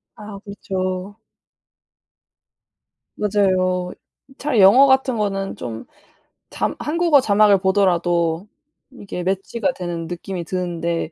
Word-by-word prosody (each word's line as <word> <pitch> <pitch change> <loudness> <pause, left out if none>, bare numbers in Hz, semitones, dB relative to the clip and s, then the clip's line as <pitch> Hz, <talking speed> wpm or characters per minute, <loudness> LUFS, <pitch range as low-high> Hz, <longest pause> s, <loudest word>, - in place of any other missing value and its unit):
아 210 -2 -10
그렇죠. 190 0 -4 2.0
맞아요. 185 -3 0 0.5
차라리 270 -8 +1
영어 250 +9 +7
같은 265 -2 +2
거는 195 -2 -2
좀 115 -1 -7 0.7
자 - - -2
한국어 315 -2 +3
자막을 205 -3 +4
보더라도 175 -2 +1 0.4
이게 200 -7 -7
매치가 195 +8 -1
되는 170 -2 -5
느낌이 175 0 -6
드는데 170 -2 -3
195 Hz, 220 characters per minute, -20 LUFS, 180-210 Hz, 2.0 s, 영어